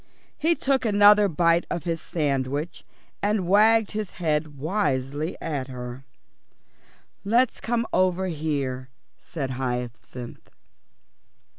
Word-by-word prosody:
He 335 +2 +2
took 270 -3 +1
another 205 -1 +6
bite 170 0 +2
of 170 - -3
his 165 -2 -2
sandwich 145 0 -2 0.4
and 205 -3 0
wagged 215 +2 +4
his 215 -2 -4
head 150 -3 -1
wisely 145 -2 -1
at 145 -5 -3
her. 125 0 -8 1.2
"Let's 235 +4 +2
come 230 0 0
over 185 0 +2
here," 140 -6 -3 0.3
said 140 -6 -5
Hyacinth. 125 -1 -5
165 Hz, 105 wpm, -25 LUFS, 135-205 Hz, 1.2 s, another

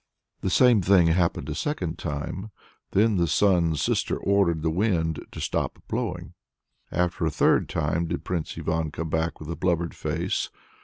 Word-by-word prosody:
The 95 - -1
same 120 +1 +5
thing 95 -1 +5
happened 85 0 +1
a - - -2
second 90 - -3
time. 85 +7 -4 0.4
Then 105 +1 +3
the 85 -1 +2
Sun's 85 -3 +2
Sister - - 0
ordered 95 -6 +2
the 80 - +1
wind 85 -4 0
to - - -8
stop - - -2
blowing. - - -3 0.6
Again 90 +1 +1
a 80 -3 +1
third 75 - +2
time 80 +2 0
did 75 - -3
Prince 85 -3 -3
Ivan 80 -1 -1
come 80 +1 -5
back 80 0 -1
with 80 +1 -6
a - - -3
blubbered 85 -2 0
face. - - -2
85 Hz, 165 wpm, -26 LUFS, 80-95 Hz, 0.6 s, same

